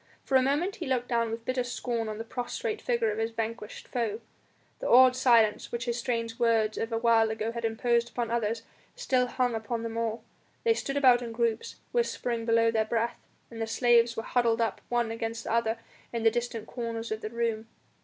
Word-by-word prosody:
For 270 - -1
a 260 - +7
moment 295 +9 0
he - - -5
looked 250 -2 -1
down 235 -2 +1
with 225 +1 -5
bitter 255 +1 0
scorn 240 -2 -3
on 215 - -5
the 225 - -4
prostrate 420 - -4
figure 235 -3 +1
of 210 - -4
his 225 0 0
vanquished 225 -1 -5
foe. 230 -3 -2 0.6
The - - -3
awed 255 +1 +7
silence 235 -4 +3
which 235 -1 -3
his 240 0 -1
strange 230 -1 -2
words 225 -2 +2
of 225 - -3
a 225 - 0
while 225 -1 +4
ago 220 +1 -2
had 235 0 -5
imposed 235 +1 +1
upon 240 -2 -3
the - - -2
others, 225 -1 -1 0.3
still 260 - +1
hung 245 -1 0
upon 225 +1 -3
them 230 0 -4
all. 230 0 -2 0.4
They 460 - +4
stood 275 -10 -3
about 255 -3 +6
in 235 -1 -5
groups, 230 -1 -1 0.2
whispering 245 - -1
below 230 0 +4
their 220 -1 +2
breath, 230 +1 -1 0.3
and 225 -1 -7
the 225 - -1
slaves 235 0 +3
were 225 - -2
huddled 235 -2 +1
up 230 -1 -1
one 240 -2 0
against 225 0 -4
the - - -4
other 230 -1 +1 0.3
in 235 -1 -3
the 225 - +5
distant 235 -1 -3
corners 230 -1 -5
of 220 0 -3
the 215 - -4
room. 230 -1 -2
230 Hz, 215 wpm, -28 LUFS, 225-245 Hz, 0.6 s, a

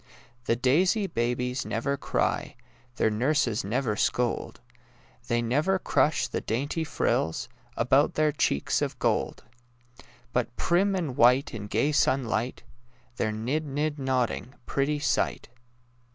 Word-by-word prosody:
The 115 - +2
daisy 175 - +2
babies 125 -3 -1
never 130 +6 -1
cry, - - -1 0.4
The 110 - +2
nurses 125 0 +1
never 110 +2 -1
scold; 120 +2 -1 0.7
They 120 0 +1
never 150 +11 +1
crush 145 -4 +1
the - - -3
dainty 140 +8 -2
frills 80 - -1 0.3
About 135 +5 +3
their 155 -1 +3
cheeks 70 - 0
of - - -2
gold; - - -1 0.9
But 125 -1 -1
prim 195 +3 +2
and 160 -9 -2
white 125 +2 +4
in 105 -2 -6
gay 115 +9 +1
sunlight 130 -5 0 0.5
They're 110 - 0
nid— 130 +9 -2
nid 145 +2 -2
nodding— 130 -1 -1
pretty 140 +2 0
sight! 145 -4 -1
130 Hz, 125 wpm, -27 LUFS, 115-150 Hz, 0.9 s, white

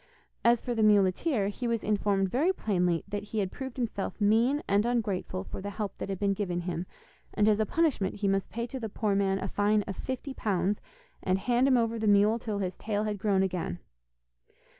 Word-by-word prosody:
As 235 0 +4
for 245 - -2
the 225 - 0
muleteer, 205 - +3
he 240 +4 -4
was 230 -1 -1
informed 200 -2 +1
very 305 +9 +3
plainly 180 - 0
that 205 0 -3
he 210 +1 -7
had 195 -3 0
proved 265 -2 -7
himself 230 -5 -3
mean 230 +8 +3
and 200 +1 +3
ungrateful 205 -6 -1
for - - -7
the 200 - -4
help 205 0 -5
that - - -4
had 195 - -2
been 200 +1 +1
given 180 -3 -2
him, 175 0 -4 0.5
and 210 - +3
as 215 -1 +4
a 215 - +1
punishment 305 - +1
he 205 0 -1
must 195 0 0
pay 235 +1 -3
to 260 +2 -6
the 225 -3 -4
poor 210 0 -1
man 195 -1 +2
a - - -3
fine 205 +1 +2
of 195 - -6
fifty 260 +4 -5
pounds, 200 -3 0 0.4
and 185 0 +1
hand 245 +6 +2
him 260 -2 +5
over 230 -1 0
the 220 - 0
mule 205 +3 +4
till 215 -3 -3
his 185 -2 -2
tail 210 -1 -1
had 210 -2 -2
grown 195 -2 +2
again. 180 - -2
205 Hz, 215 wpm, -29 LUFS, 195-230 Hz, 0.5 s, him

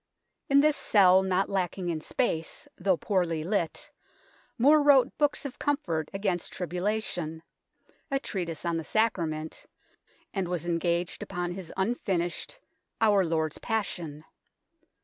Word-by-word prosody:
In 280 0 +6
this 305 0 +3
cell, 190 -3 +5
not 190 0 +1
lacking 185 -1 -2
in 160 -2 -2
space, 165 -5 -2
though 185 -1 +1
poorly 170 -6 0
lit, 175 -3 -2 0.7
More 295 +5 +6
wrote 275 -3 +5
books 295 -1 +1
of 275 - -6
comfort 170 - -1
against 195 -3 -1
tribula 190 +5 -1
tion, 160 -3 -4 0.7
a 275 - +1
treatise 175 - -4
on 170 -1 0
the 165 - -3
Sacrament, 165 -7 -1 0.7
and 195 -4 -1
was 175 -1 -3
engaged 170 0 0
upon 175 0 -3
his 180 -2 -7
unfinished 190 - -1 0.2
" - - -54
Our 200 -2 +4
Lord's 160 -2 -1
Passion." 170 -9 -3
180 Hz, 130 wpm, -28 LUFS, 165-215 Hz, 0.7 s, In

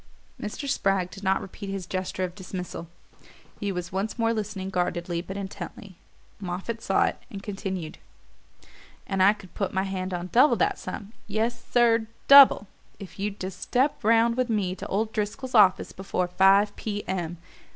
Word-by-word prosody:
Mr. 215 +7 -5
Spragg 195 -8 +1
did 195 - -10
not 190 0 +2
repeat 195 +1 -8
his 195 -2 -4
gesture 185 0 -3
of 180 -1 -3
dismissal: 180 -3 -7 0.7
he 205 -1 -2
was 180 -1 -5
once 195 +5 -2
more 230 -1 +2
listening 205 -3 -4
guardedly 175 -1 -1
but 190 +2 -7
intently. 195 -1 -7 0.4
Moffatt 195 +5 -4
saw 195 - +2
it - - -3
and 195 -1 -8
continued. 190 -5 -5 1.1
"And 195 -1 -1
I 200 +2 +7
could 195 -4 -15
put 195 -2 -3
my 190 - +2
hand 190 -1 -3
on 180 0 -4
double 255 +1 +6
that 195 - +1
sum 200 +3 -7
yes, 225 +3 -1
sir, 230 -2 +4 0.2
DOUBLE 275 -7 +9 0.3
if 195 -1 -11
you'd 200 0 -3
just 185 0 -6
step 265 +4 +1
round 230 +2 +4
with 255 -1 0
me 200 -5 0
to 185 - -7
old 215 +2 -1
Driscoll's 215 +5 -3
office 200 -5 +5
before 185 -1 -2
five 195 +3 +4
P. 205 -2 -4
M. 175 -2 -3
195 Hz, 170 wpm, -26 LUFS, 185-215 Hz, 1.1 s, DOUBLE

